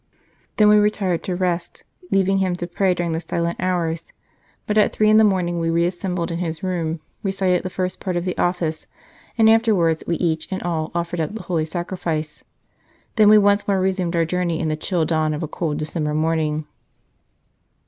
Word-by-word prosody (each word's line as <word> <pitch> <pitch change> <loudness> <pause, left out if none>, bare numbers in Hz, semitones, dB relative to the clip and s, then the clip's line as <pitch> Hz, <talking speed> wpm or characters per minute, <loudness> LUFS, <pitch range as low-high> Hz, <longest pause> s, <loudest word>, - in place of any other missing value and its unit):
Then 210 - +6
we 210 0 +6
retired 200 -4 +1
to 180 - -2
rest, 175 -1 -2 0.3
leaving 195 0 +2
him 185 -2 0
to 175 - -4
pray 185 +1 +1
during 175 -1 -2
the 160 - -1
silent 170 0 -2
hours; 170 -3 -2 0.5
but 210 - -1
at 215 - +4
three 215 0 +3
in 215 - +6
the 220 - +6
morning 180 -4 +1
we 165 0 0
reassembled 175 +1 -1
in 165 - -3
his 165 -2 -4
room, 165 -3 -2 0.2
recited 190 -2 +1
the 185 - -4
first 185 0 -3
part 185 -2 -3
of 175 0 -1
the 180 - -2
Office, 175 -3 -1 0.5
and 225 -1 +5
afterwards 210 -8 +3
we 170 - +1
each 160 -3 -1
and 190 -1 -4
all 165 -2 -2
offered 170 0 -2
up 160 +7 -3
the 220 - -6
Holy 170 -3 -1
Sacrifice. 165 -2 -4 0.7
Then 215 -2 +6
we 215 - +8
once 205 0 +3
more 195 -2 +2
resumed 185 -2 0
our 165 -1 +2
journey 175 -1 -1
in 160 - -1
the 155 - 0
chill 165 +1 -1
dawn 155 -1 0
of 150 - -4
a - - -2
cold 150 -1 -3
December 150 -1 -2
morning." 155 -1 0
175 Hz, 195 wpm, -21 LUFS, 165-190 Hz, 0.7 s, we